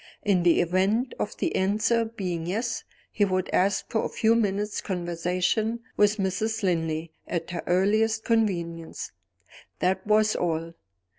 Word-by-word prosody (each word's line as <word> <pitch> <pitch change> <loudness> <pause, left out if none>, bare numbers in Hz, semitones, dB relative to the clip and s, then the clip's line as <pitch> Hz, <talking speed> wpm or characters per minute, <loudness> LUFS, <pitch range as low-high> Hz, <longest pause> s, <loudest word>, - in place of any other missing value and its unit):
In 195 -4 +3
the 175 -1 +4
event 195 +8 +1
of 210 - -3
the - - -1
answer 215 +4 +2
being 180 -7 -4
Yes, 225 +6 -2 0.3
he 210 - +1
would 185 -2 0
ask 190 +1 +2
for 220 - +1
a - - -2
few 225 0 +2
minutes' 210 -2 0
conversation 180 +5 -1
with 210 +1 +3
Mrs. 215 +3 -1
Linley, 165 -3 -1
at 170 -1 -3
her 175 - -3
earliest 215 +5 +2
convenience. 170 -8 -1 0.7
That 190 +2 0
was 215 0 +4
all. 165 -1 -1
190 Hz, 140 wpm, -26 LUFS, 175-215 Hz, 0.7 s, the